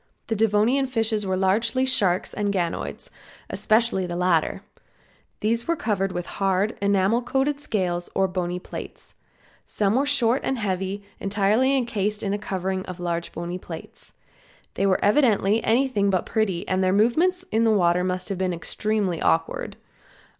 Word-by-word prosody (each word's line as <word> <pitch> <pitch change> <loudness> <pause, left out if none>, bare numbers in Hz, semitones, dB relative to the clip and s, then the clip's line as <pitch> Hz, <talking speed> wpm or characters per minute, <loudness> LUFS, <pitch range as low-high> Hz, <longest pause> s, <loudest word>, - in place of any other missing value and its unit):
The 225 - +1
Devonian 225 +5 +2
fishes 225 -4 -1
were 190 0 0
largely 215 +7 +1
sharks 195 -9 +2
and 205 -1 -1
ganoids, 175 -4 -3 0.4
especially 220 -4 +2
the 175 - -4
latter. 175 -2 +1 0.8
These 230 +2 0
were 335 - +2
covered, 200 - -1
with 175 -1 -4 0.2
hard, 195 +3 +1
enamel 200 +3 +2
coated 270 +3 0
scales 180 -10 -1
or 195 0 +3
bony 180 -1 -3
plates. 180 - -9 0.5
Some 205 -1 0
were 270 +4 +1
short 260 -3 +3
and 265 - -1
heavy 195 -1 -2 0.2
and - - -8
entirely 215 +7 +3
encased 215 -4 -2
in 200 -1 -1
a 205 - -2
covering 190 -1 -3
of 180 -1 -7
large 170 -1 -3
bony 175 +2 -5
plates. - - -11 0.6
They 195 - 0
were 190 0 +2
evidently 215 -3 +3
anything 230 -4 +2
but 185 -2 0
pretty 200 -6 -1
and 190 0 +1
their 185 0 +2
movements 335 - +2
in 225 - +2
the 225 - +4
water 180 -4 +3
must 185 +2 -2
have 195 -2 -3
been 185 -1 0
extremely 195 +1 -2
awkward. 80 0 0
200 Hz, 160 wpm, -24 LUFS, 185-230 Hz, 0.8 s, the